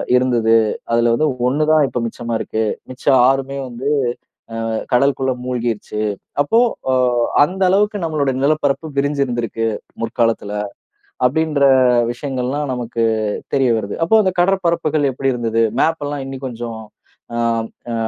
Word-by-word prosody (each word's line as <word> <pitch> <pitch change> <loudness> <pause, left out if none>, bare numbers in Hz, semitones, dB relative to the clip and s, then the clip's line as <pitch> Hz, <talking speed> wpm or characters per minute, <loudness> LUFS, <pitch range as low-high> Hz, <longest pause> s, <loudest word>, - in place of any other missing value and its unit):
இருந்தது. 120 -3 +3 0.4
அதில 115 0 +3
வந்து 155 +7 +2 0.2
1 145 +4 +1
தான் 155 -2 +5
இப்போ 125 - -3
மிச்சமா 115 +1 -5
இருக்கு. 110 0 -2 0.3
மிச்சம் 130 +1 +2
6மே 135 +1 -1
வந்து 125 +2 -6 0.8
அ - - -2 0.2
கடலுக்குள்ள 130 +1 +2
மூழ்கிருச்சு. 120 -4 -3 0.4
அப்போ 185 +11 +2 0.3
அ - - +3 0.5
அந்த 190 +5 -4
அளவுக்கு 205 +2 +2
நம்மளுடைய 145 -5 0
நிலப்பரப்பு 150 +1 +1
விரிஞ்சிருந்திருக்கு 125 -6 -1 0.4
முற்காலத்தில, 115 -3 0 0.7
அப்படின்ற 155 +2 0 0.5
விஷயங்கள்லாம் 135 +2 -3
நமக்கு 120 -1 -2 0.5
தெரிய 135 -3 +3
வருது. 100 -2 -5
அப்போ 220 - +4
அந்த 185 - +1
கடற்பரப்புகள் 170 -6 +1
எப்படி 135 +1 0
இருந்தது? 115 -1 0 0.2
மேப் 160 -2 +1
எல்லாம் 145 -1 -4
இன்னும் 135 0 -6
கொஞ்சம் 115 -2 -6 0.6
அம் 115 -1 0 0.2
அ - - -2
130 Hz, 125 wpm, -18 LUFS, 120-145 Hz, 0.8 s, தான்